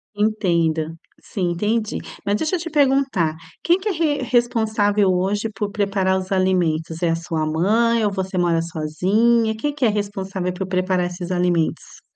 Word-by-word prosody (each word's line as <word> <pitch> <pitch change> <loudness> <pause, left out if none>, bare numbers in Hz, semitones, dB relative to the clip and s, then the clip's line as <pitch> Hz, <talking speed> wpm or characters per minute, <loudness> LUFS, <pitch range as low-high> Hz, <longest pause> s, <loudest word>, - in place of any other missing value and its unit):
Entendo 170 -7 +1 0.3
sim, 180 -4 -2
entendi, 215 +5 -1 0.3
mas 200 - +1
deixa 315 - -1
eu - - -2
te 330 0 -5
perguntar. 270 - +2 0.3
Quem 345 +2 +3
que 415 +3 -2
é - - +1
re 310 -5 0
responsável 220 -4 +2
hoje 195 +4 0
por 205 +1 -3
preparar 195 -2 +1
os 185 +1 -8
alimentos 175 -3 0
é 170 - +3
a - - +1
sua 165 -1 -2
mãe 220 +9 +2
ou 205 - +1
você 190 -1 -3
mora 170 -2 +2
sozinha? 195 +8 +1
Quem 290 +7 -2
que 280 -3 0
é - - +5
responsável 195 -3 -3
por 185 +1 -4
preparar 185 -1 0
esses 175 0 -5
alimentos? 175 -2 -1
195 Hz, 170 wpm, -21 LUFS, 175-225 Hz, 0.3 s, é